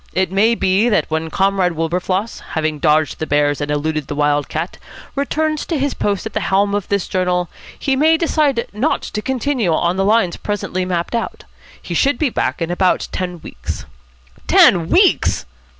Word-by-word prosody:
It 185 0 0
may 215 +4 +3
be 195 +3 +2
that 210 -7 +1
when 160 +1 -1
Comrade 190 -1 +1
Wilberfloss, 180 +6 -2
having 155 -1 -1
dodged 155 +1 +2
the 155 - -3
bears 145 0 +1
and 145 - -2
eluded 150 0 -1
the 145 - -4
wild 145 -1 +1
cat, 160 +3 -4 0.3
returns 305 +2 -1
to 330 - -1
his 280 0 0
post 200 0 -1
at 220 - -5
the - - 0
helm 200 +1 +1
of 205 -2 -1
this 200 -2 -1
journal, 180 -2 0 0.3
he 270 - 0
may 315 +4 +4
decide 300 -7 +1
not 240 +9 0
to 210 - -4
continue 255 -5 0
on 175 +3 +1
the 195 - +2
lines 205 -3 +3
at - - -28
present 205 -1 -3
mapped 175 +1 -2
out. 230 - -3 0.4
He - - -6
should 280 +1 +2
be 295 -5 0
back 175 - -1
in 165 - -3
about 180 +1 +1
ten 180 -3 -4
weeks." - - -7 0.6
"Ten 170 -2 +5
weeks!" 380 0 +3
190 Hz, 185 wpm, -18 LUFS, 165-230 Hz, 0.6 s, Ten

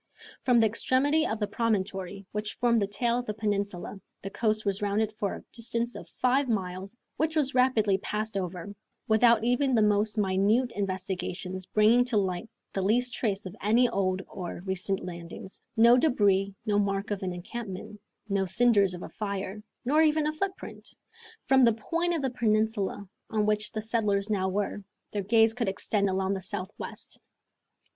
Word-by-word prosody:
From 245 -2 +4
the 225 - +5
extremity 265 +8 +2
of 220 - -2
the 210 - +1
promontory 195 -3 -2
which 210 0 -4
formed 235 -1 +2
the 200 - 0
tail 235 +4 0
of 245 - -6
the 210 - -3
peninsula 205 -2 -3 0.2
the 195 - -5
coast 215 -1 0
was 200 0 +1
rounded 210 +1 0
for 205 -2 -2
a - - -10
distance 235 0 -3
of - - -9
five 260 +1 +2
miles, 190 0 -3 0.2
which 315 +1 0
was 290 -3 +2
rapidly 225 -6 +3
passed 215 +2 -3
over, 185 +1 -4 0.3
without 225 0 +5
even 245 +2 +2
the 220 - +4
most 210 +1 +2
minute 210 +5 +2
investigations 185 -1 -4
bringing 220 +3 +4
to 245 -3 +1
light 190 +2 -1 0.2
the 195 - -1
least 245 +6 +2
trace 200 -5 -1
of 185 +1 -7
any 230 +4 +4
old 190 -1 0
or 175 -1 -7
recent 190 0 -2
landings; 175 +1 -9 0.2
no 235 +2 +7
debris, 200 -8 +2
no 205 -2 +2
mark 200 0 -1
of 205 - -2
an 185 -1 -2
encampment, 195 +2 -7 0.3
no 195 -1 +1
cinders 200 -2 +3
of 175 - -8
a - - -7
fire, 200 -1 -4 0.2
nor 300 +5 +4
even 310 -1 +3
a 305 - 0
footprint! 380 +4 -5 0.6
From 265 -1 +5
the 230 -2 +6
point 335 +10 -1
of 310 - -2
the 265 - 0
peninsula 215 -4 0 0.2
on 215 -1 +1
which 210 0 +1
the 215 - -4
settlers 210 -2 0
now 190 -2 +1
were 205 +1 -2 0.3
their 205 - -2
gaze 225 +2 +4
could 235 -4 -1
extend 200 +1 0
along 190 +1 0
the 190 - -3
southwest. 190 +1 -7
210 Hz, 175 wpm, -28 LUFS, 195-235 Hz, 0.6 s, no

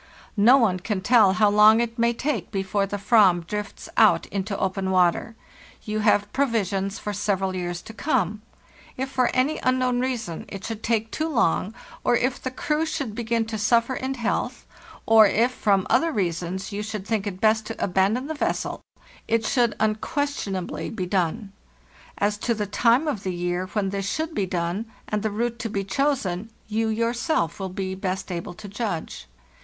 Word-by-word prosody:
No 235 +6 +6
one 205 -8 +2
can 195 +1 -2
tell 215 -3 +5
how 210 0 +3
long 210 +2 +7
it 235 0 -2
may 235 0 +3
take 235 - -2
before 195 0 -1
the 205 - -3
"vam 195 -5 +4
drifts 210 +3 -5
out - - +5
into 200 0 -3
open 190 0 -1
water. 185 +5 +2 0.5
You 215 0 -2
have 205 -1 +2
provisions 205 -7 0
for 210 - -4
several 195 -1 -1
years 175 -1 -4
to 225 - -10
come; 215 - 0 0.6
if 265 +1 -3
for 255 -2 +2
any 265 +5 +1
unknown 255 -1 +1
reason 235 -10 -3
it 195 -1 -8
should 225 -1 -5
take 225 -1 0
too 315 +1 -2
long, 225 - +1 0.3
or - - +3
if 255 +2 0
the 260 - -2
crew 300 +4 -1
should 280 -8 -3
begin 230 0 -1
to 220 -1 -4
suffer 230 +4 +2
in 260 +1 -3
health, 235 -3 -2 0.4
or 220 -1 +7
if 235 +5 +2
from 200 -6 +1
other 330 0 +3
reasons 185 - -2
you 205 +1 -3
should 210 -2 -5
think 215 -2 -1
it 185 -2 -5
best 220 0 +2
to 225 - -5
abandon 195 +7 +1
the 315 - -3
vessel, 300 - -2 0.5
it 225 -1 +1
should 240 -1 +2
unquestionably 220 - -2
be 195 -5 -4
done. 190 +2 -1 0.6
As 205 +1 0
to 235 +1 0
the 210 -1 -2
time 235 +8 +2
of 270 -10 -1
the 185 -2 -3
year 175 +1 -2
when 200 -3 0
this 195 0 -2
should 315 +1 -2
be 200 -7 -1
done, 175 +5 -2 0.2
and 210 -1 -1
the 220 - 0
route 235 +2 -2
to 230 - -3
be 200 -2 -2
chos 275 +5 0
en, 180 +4 -4 0.2
you 220 +1 0
yourself 230 - 0
will 190 -1 -3
be 190 0 -4
best 190 0 -3
able 175 0 -5
to 210 +2 -10
judge. 195 - -4
215 Hz, 185 wpm, -24 LUFS, 190-235 Hz, 0.6 s, long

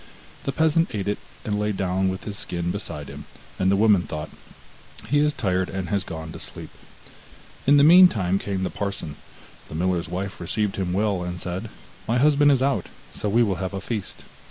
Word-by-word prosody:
The 135 - 0
peasant 160 +3 +2
ate 100 -1 -2
it, 105 - -1 0.3
and 105 -1 -1
lay 105 0 0
down 95 -1 0
with 95 +1 -4
his 105 - -5
skin 85 -3 -3
beside - - -5
him, - - -9 0.3
and 95 - +3
the 100 - +4
woman 105 -2 +5
thought: 75 -3 -6 0.8
'He 145 - +3
is 150 0 +3
tired 95 -9 0
and 95 -3 -4
has 100 -1 +1
gone 80 -1 -7
to - - -8
sleep.' - - -9 1.0
In 145 +1 +7
the 140 - +6
meantime 145 - +6
came 95 -2 -3
the - - -2
parson; 100 -7 -4 0.5
the - - -7
miller's 85 -1 0
wife 95 +2 -4
received 105 +3 -1
him 95 -2 -1
well, 100 0 +1
and 90 0 -4
said: 95 +6 -4 0.4
'My 115 - +2
husband 145 +1 +5
is 130 -2 +3
out, 140 0 +1 0.3
so 105 - -2
we 115 +4 +4
will 100 -5 0
have 95 +1 -3
a - - -2
feast. 105 0 -5
100 Hz, 200 wpm, -24 LUFS, 90-115 Hz, 1.0 s, In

